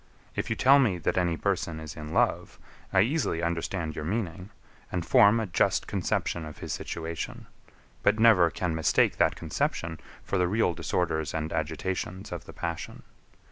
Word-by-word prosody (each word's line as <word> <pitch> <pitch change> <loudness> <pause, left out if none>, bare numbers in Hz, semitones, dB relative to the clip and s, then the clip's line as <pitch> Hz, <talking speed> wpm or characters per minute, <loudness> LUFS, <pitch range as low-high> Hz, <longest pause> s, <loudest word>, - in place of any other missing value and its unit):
If - - -2
you 110 - 0
tell 135 +5 +6
me, 110 -10 +2
that 85 - -1
any 85 -2 +1
person 90 -5 -1
is 80 -2 -8
in 75 0 -7
love, - - +1 0.3
I 95 - +5
easily 115 - 0
understand 85 -1 -2
your 75 - -4
meaning, 95 0 -3 0.4
and 85 -3 -2
form 105 +3 +6
a 110 - -1
just 90 - +1
conception 85 - -1
of 75 -1 -8
his - - -5
situation; 85 0 -5 0.6
but - - +3
never 110 -7 +6
can 90 0 -2
mistake 80 0 +2
that - - +3
conception 80 -1 -2 0.2
for 100 - -1
the 90 - +3
real 105 -1 +2
disorders 80 -4 -1
and 80 0 -2
agitations 90 +5 -3
of 85 -4 -6
the - - -11
passion. 85 -1 -5
85 Hz, 170 wpm, -28 LUFS, 80-100 Hz, 0.6 s, tell